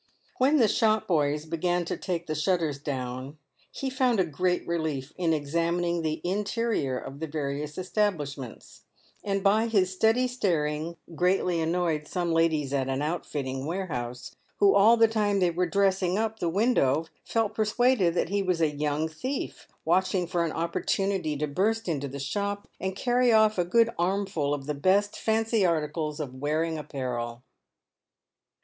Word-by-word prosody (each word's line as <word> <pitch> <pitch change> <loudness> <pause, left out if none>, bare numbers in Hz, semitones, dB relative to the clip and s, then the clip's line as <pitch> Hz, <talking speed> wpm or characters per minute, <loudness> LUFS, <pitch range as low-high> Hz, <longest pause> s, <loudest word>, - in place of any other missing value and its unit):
When 275 +4 +4
the 235 -6 +5
shop 215 +1 +2
boys 150 -3 +1
began 175 +2 -1
to - - -2
take 175 -3 -3
the 155 - -3
shutters 155 -2 0
down, 130 0 -5 0.3
he 270 -1 -4
found 255 -4 +2
a - - +5
r - - -3
PAYED 160 - -10
WITH 140 - -19
GOLD. 185 - +2
85 - - -9
great - - -19
relief 160 -5 -2
in 175 -3 0
examining 170 +3 0
the 155 -1 -2
interior 200 - -1
of 135 +2 -8
the 160 - -3
various 150 0 -4
establishments, 160 - -3 0.4
and 195 -1 -1
by 215 +3 +3
his 190 -5 +2
steady 225 +6 +3
staring 165 -8 -1 0.2
greatly 180 0 +1
annoyed 165 -2 0
some 175 -2 -1
ladies 160 -4 +1
at 135 -1 0
an 135 +2 -1
outfitting 140 -4 -3
warehouse, 125 -9 -4 0.2
who 200 -1 +5
all 215 +4 +6
the 225 0 +6
time 210 -2 +1
they 180 -2 +3
were 180 +2 0
"dressing 190 0 +1
up" 220 0 -1
the 170 - 0
window 165 - +2 0.2
felt 225 -2 0
persuaded 215 -4 +2
that 170 - 0
he 200 +1 +1
was 180 -3 0
a 155 -3 +1
young 150 +1 0
thief 255 - -5 0.2
watching 185 -1 +2
for 175 0 0
an 165 - -1
opportu 170 +4 -1
nity 175 -7 -1
to 150 - 0
burst 210 +10 0
into 145 -4 -1
the 140 +1 -7
shop 200 +9 -3
and 190 0 -3
carry 245 +2 +2
off 215 -2 +4
a - - +4
good 230 +6 +3
armful 185 -5 0
of 145 -2 -2
the 150 - -2
best 190 +8 +2
fancy 225 -1 +1
articles 155 -2 -1
of 140 -4 -4
wearing 155 +4 -1
apparel. 125 -4 -4
170 Hz, 175 wpm, -27 LUFS, 150-200 Hz, 0.4 s, all